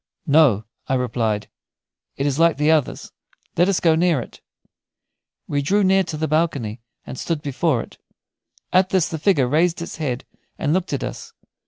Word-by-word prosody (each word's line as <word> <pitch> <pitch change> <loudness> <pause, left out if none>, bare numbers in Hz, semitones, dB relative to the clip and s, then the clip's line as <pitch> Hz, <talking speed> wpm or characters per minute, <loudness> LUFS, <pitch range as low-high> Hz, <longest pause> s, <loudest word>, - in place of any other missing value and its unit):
"No," 140 - +4 0.2
I 135 - +1
replied; 115 -4 -1 0.7
"it 140 - -1
is 145 +1 0
like 165 -2 +4
the 150 +2 +3
others. 155 -4 0 0.4
Let 175 +3 +3
us 195 - +1
go 165 -2 +4
near 165 -2 +2
it." 120 - -10 1.1
We 145 -1 0
drew 200 +8 +2
near 190 0 +4
to 160 -3 -5
the 160 +1 -1
balcony 140 -8 -1 0.2
and 130 - -8
stood 165 -3 -3
before 140 -2 0
it. - - -16 0.7
At 185 +1 +4
this 185 -4 +2
the 160 - -4
figure 150 -7 +2
raised 165 +6 +2
its 170 - -6
head 130 -6 -3 0.3
and 150 -1 0
looked 185 0 -1
at 140 - -2
us. - - -7
155 Hz, 175 wpm, -21 LUFS, 135-170 Hz, 1.1 s, No